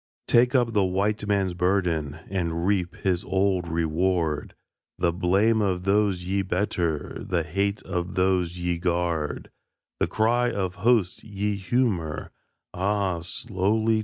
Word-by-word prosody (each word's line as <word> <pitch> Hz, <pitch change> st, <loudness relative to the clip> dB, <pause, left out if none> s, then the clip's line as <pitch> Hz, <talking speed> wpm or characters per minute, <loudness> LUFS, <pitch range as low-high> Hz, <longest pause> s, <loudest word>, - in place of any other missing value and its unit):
Take 125 Hz, +2 st, +4 dB
up 120 Hz, -3 st, +2 dB
the 105 Hz, -2 st, +3 dB
White 100 Hz, +3 st, 0 dB
Man's 100 Hz, -3 st, +1 dB
burden 85 Hz, -5 st, 0 dB
And 85 Hz, -3 st, -2 dB
reap 90 Hz, -3 st, 0 dB
his 90 Hz, -2 st, -1 dB
old 95 Hz, -2 st, +1 dB
reward; 80 Hz, -1 st, 0 dB, 0.4 s
The 85 Hz, -, +1 dB
blame 100 Hz, +5 st, +2 dB
of 95 Hz, -3 st, 0 dB
those 100 Hz, -2 st, +2 dB
ye 95 Hz, +2 st, 0 dB
better, 90 Hz, -5 st, -2 dB
The 85 Hz, -3 st, 0 dB
hate 100 Hz, +6 st, -1 dB
of 90 Hz, 0 st, -3 dB
those 90 Hz, -2 st, +1 dB
ye 85 Hz, -1 st, -1 dB
guard 85 Hz, -3 st, -1 dB, 0.5 s
The -, -, +2 dB
cry 120 Hz, +3 st, +2 dB
of 95 Hz, -4 st, -2 dB
hosts 110 Hz, -5 st, +2 dB
ye 105 Hz, 0 st, -2 dB
humour 95 Hz, -, -1 dB, 0.4 s
(Ah, 95 Hz, -1 st, 0 dB
slowly!) 110 Hz, +3 st, 0 dB
95 Hz, 135 wpm, -25 LUFS, 85-105 Hz, 0.5 s, Take